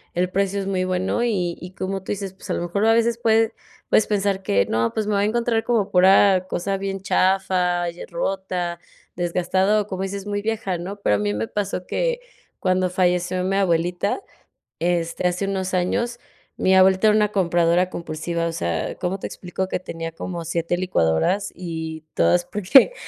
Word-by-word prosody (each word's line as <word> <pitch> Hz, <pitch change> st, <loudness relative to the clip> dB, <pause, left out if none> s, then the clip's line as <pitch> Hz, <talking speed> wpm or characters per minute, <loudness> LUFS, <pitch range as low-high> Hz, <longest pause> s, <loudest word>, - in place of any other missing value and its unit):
el 180 Hz, +1 st, 0 dB
precio 195 Hz, +1 st, 0 dB
es 195 Hz, -, -3 dB
muy 185 Hz, -1 st, 0 dB
bueno 185 Hz, +5 st, 0 dB
y 180 Hz, -7 st, 0 dB
y 180 Hz, -, -8 dB
como 195 Hz, +1 st, -3 dB
tú -, -, -5 dB
dices, 195 Hz, -2 st, -4 dB
pues 190 Hz, -, -13 dB
a -, -, +1 dB
lo -, -, -2 dB
mejor 200 Hz, +5 st, 0 dB
a 225 Hz, -, +5 dB
veces 230 Hz, 0 st, +2 dB
puede 225 Hz, -1 st, +3 dB, 0.4 s
puedes 215 Hz, -, +4 dB
pensar 200 Hz, -2 st, 0 dB
que 100 Hz, -, +2 dB
no, 115 Hz, +1 st, 0 dB
pues 215 Hz, -1 st, -2 dB
me 210 Hz, -, 0 dB
voy 200 Hz, -, +2 dB
a -, -, +3 dB
encontrar 230 Hz, +1 st, +1 dB
como 225 Hz, -5 st, +1 dB
pura 190 Hz, 0 st, +5 dB
cosa 195 Hz, +2 st, -1 dB
bien 195 Hz, 0 st, -3 dB
chafa 185 Hz, -2 st, +1 dB
y 170 Hz, -, -11 dB
eh, -, -, -5 dB
rota, 180 Hz, -1 st, -2 dB, 0.4 s
desgastada 180 Hz, +4 st, +1 dB
o, 205 Hz, -, -7 dB
como 190 Hz, -2 st, -4 dB
dices, 195 Hz, 0 st, -4 dB
muy 205 Hz, 0 st, -2 dB
vieja, 215 Hz, -4 st, -2 dB
¿no? 190 Hz, +4 st, -6 dB
Pero 105 Hz, -, +3 dB
a -, -, -4 dB
mí 105 Hz, 0 st, 0 dB
me 110 Hz, +2 st, -2 dB
pasó 200 Hz, -3 st, -3 dB
que -, -, -1 dB, 0.4 s
cuando 185 Hz, 0 st, +1 dB
falleció 180 Hz, 0 st, +1 dB
mi 190 Hz, +1 st, 0 dB
abuelita, 180 Hz, -, 0 dB, 0.6 s
este, 170 Hz, 0 st, 0 dB
hace 180 Hz, +2 st, -1 dB
unos 190 Hz, -1 st, -2 dB
años, 235 Hz, +7 st, 0 dB, 0.4 s
mi 190 Hz, -, +3 dB
abuelita 190 Hz, +2 st, +5 dB
era 210 Hz, -, +5 dB
una 210 Hz, -1 st, +1 dB
compradora 175 Hz, -1 st, +2 dB
compulsiva, 170 Hz, 0 st, -3 dB
o 165 Hz, -, -3 dB
sea, 85 Hz, -, -2 dB
cómo 185 Hz, +2 st, -3 dB
te -, -, -4 dB
explico 185 Hz, +1 st, -4 dB
que -, -, -2 dB
tenía 165 Hz, -2 st, -6 dB
como 170 Hz, 0 st, -5 dB
7 170 Hz, +1 st, -1 dB
licuadoras 180 Hz, -, +1 dB
y 160 Hz, -3 st, -6 dB
todas 85 Hz, +1 st, +3 dB
porque, 210 Hz, -, +5 dB
185 Hz, 190 wpm, -22 LUFS, 175-200 Hz, 0.6 s, a